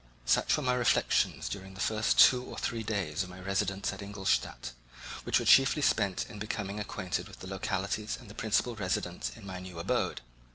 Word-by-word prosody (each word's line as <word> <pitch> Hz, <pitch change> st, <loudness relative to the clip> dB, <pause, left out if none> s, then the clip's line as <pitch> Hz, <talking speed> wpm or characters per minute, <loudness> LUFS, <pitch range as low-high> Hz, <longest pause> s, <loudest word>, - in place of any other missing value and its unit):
Such -, -, +3 dB
were -, -, -3 dB
my 125 Hz, -1 st, +2 dB
reflections 125 Hz, -2 st, +2 dB
during 95 Hz, -1 st, -6 dB
the -, -, -11 dB
first 110 Hz, +1 st, +1 dB
two 125 Hz, -1 st, +7 dB
or -, -, -9 dB
three 115 Hz, -1 st, -2 dB
days 105 Hz, -2 st, -2 dB
of 95 Hz, -, -4 dB
my 90 Hz, 0 st, -10 dB
residence 95 Hz, +1 st, -1 dB
at 100 Hz, -, -8 dB
Ingolstadt, 100 Hz, -10 st, -1 dB, 0.5 s
which -, -, +3 dB
were -, -, -1 dB
chiefly 135 Hz, +2 st, +6 dB
spent 100 Hz, -7 st, +2 dB
in 105 Hz, -2 st, -10 dB
becoming 105 Hz, -1 st, -3 dB
acquainted 100 Hz, -3 st, -3 dB
with -, -, -13 dB
the 95 Hz, -, -7 dB
localities 95 Hz, +2 st, -2 dB
and 120 Hz, -, -14 dB
the 105 Hz, -, -10 dB
principal 115 Hz, +2 st, 0 dB
residents 90 Hz, -, -2 dB
in -, -, -12 dB
my 95 Hz, -2 st, -6 dB
new 90 Hz, -1 st, -9 dB
abode. 85 Hz, -, -1 dB
100 Hz, 195 wpm, -30 LUFS, 95-110 Hz, 0.5 s, two